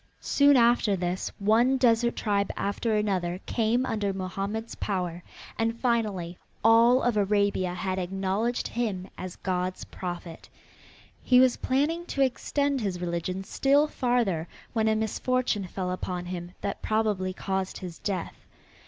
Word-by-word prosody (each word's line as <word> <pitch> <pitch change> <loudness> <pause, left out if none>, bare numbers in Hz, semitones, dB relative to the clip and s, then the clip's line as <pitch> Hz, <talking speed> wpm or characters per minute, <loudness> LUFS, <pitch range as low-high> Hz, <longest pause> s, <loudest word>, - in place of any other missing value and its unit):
Soon 285 -1 +4
after 235 -4 +4
this 180 0 -2
one 230 +6 +3
desert 235 -1 +3
tribe 200 -2 0
after 215 +2 -1
another 185 -4 0
came 235 +2 +1
under 210 -5 -1
Mohammed's 195 +4 -4
power, 180 -3 -3 0.4
and 230 +1 0
finally 210 -8 -1 0.2
all 230 +3 +6
of 240 -3 +1
Arabia 200 -3 +1
had 185 +1 -2
acknowledged 195 +6 -1
him 210 -6 -2
as 185 -1 -7
God's 185 0 -2
prophet. 175 -2 -7 0.7
He 250 -1 +5
was 255 -1 +5
planning 315 +6 0
to 275 - +1
extend 280 +1 0
his 190 -4 -2
religion 180 +2 -3
still 280 +8 +3
farther 240 - 0 0.3
when 220 -2 +1
a 220 - +3
misfortune 220 -1 0
fell 180 0 -3
upon 180 -1 -4
him 175 0 -6
that 200 - -3
probably 210 -4 0
caused 190 0 -3
his 180 -3 -8
death. 190 -4 -4
205 Hz, 135 wpm, -27 LUFS, 185-235 Hz, 0.7 s, all